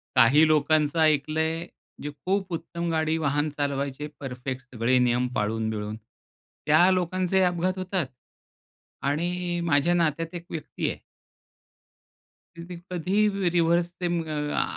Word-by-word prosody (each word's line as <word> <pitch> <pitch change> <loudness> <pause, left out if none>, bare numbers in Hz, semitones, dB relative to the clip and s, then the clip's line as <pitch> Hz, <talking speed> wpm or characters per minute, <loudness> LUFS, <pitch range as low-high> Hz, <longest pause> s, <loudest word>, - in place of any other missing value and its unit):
काही 130 +6 +6
लोकांचं 155 0 +2
ऐकलंय 160 +2 +1 0.4
जे 145 - -3 0.2
खूप 190 -1 0
उत्तम 170 +1 -4
गाडी 160 0 +1
वाहन 145 0 0
चालवायचे 140 0 -2
परफेक्ट 130 -1 -5
सगळे 120 +3 +2
नियम 125 0 +2
पाळून-बिळून, 110 0 -2 0.7
त्या 155 +5 +5
लोकांचे 185 +1 +1
अपघात 180 +1 0
होतात. 185 -2 -1 1.0
आणि 175 +4 -1
माझ्या 165 +1 +3
नात्यात 165 0 0
एक 170 - -7
व्यक्ती 160 - -3
आहे - - -6 1.6
तर 170 - -8
ते 180 - -6 0.2
कधी 180 +3 -1 0.2
र 195 -3 +1
रिव्हर्स 170 0 +3
ते 180 - -1
म 170 -1 0 0.4
आ - - +2
160 Hz, 125 wpm, -26 LUFS, 140-175 Hz, 1.6 s, काही